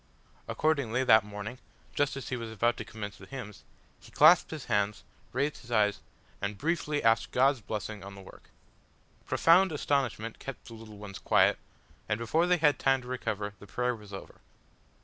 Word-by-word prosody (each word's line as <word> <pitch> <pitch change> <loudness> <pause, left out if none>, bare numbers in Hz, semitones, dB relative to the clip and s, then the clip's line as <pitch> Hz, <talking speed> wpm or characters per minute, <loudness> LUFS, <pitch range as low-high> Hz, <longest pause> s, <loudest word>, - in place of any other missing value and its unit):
Accordingly, 140 -6 +1
that 110 -4 +6
morning, 105 +4 -7 0.3
just 145 -1 0
as 135 - -6
he 130 - -1
was 115 -2 -5
about 120 +2 +1
to - - -4
commence 105 -2 -7
the - - -12
hymns, 115 -7 -8 0.4
he - - -16
clasped - - +6
his - - -6
hands, 105 0 0 0.3
raised 140 +4 -1
his 120 - -15
eyes, 105 -3 +2 0.4
and 100 +1 -3
briefly 155 - -1
asked 115 0 +3
God's 135 0 +3
blessing 105 -1 -5
on 100 0 -9
the 100 - -11
work. 95 - -15 0.8
Profound 180 +3 +5
astonishment 130 -7 -1
kept 135 - -8
the 115 - -11
little 110 -2 -11
ones 100 -1 -8
quiet, - - +3 0.5
and 105 - +1
before 155 +10 +1
they 180 0 +4
had 150 -3 +3
time 135 -1 +2
to - - -11
recover 110 -5 -3
the 105 - -13
prayer 125 +3 -1
was 105 -2 -14
over. 95 - -10
115 Hz, 180 wpm, -30 LUFS, 105-135 Hz, 0.8 s, that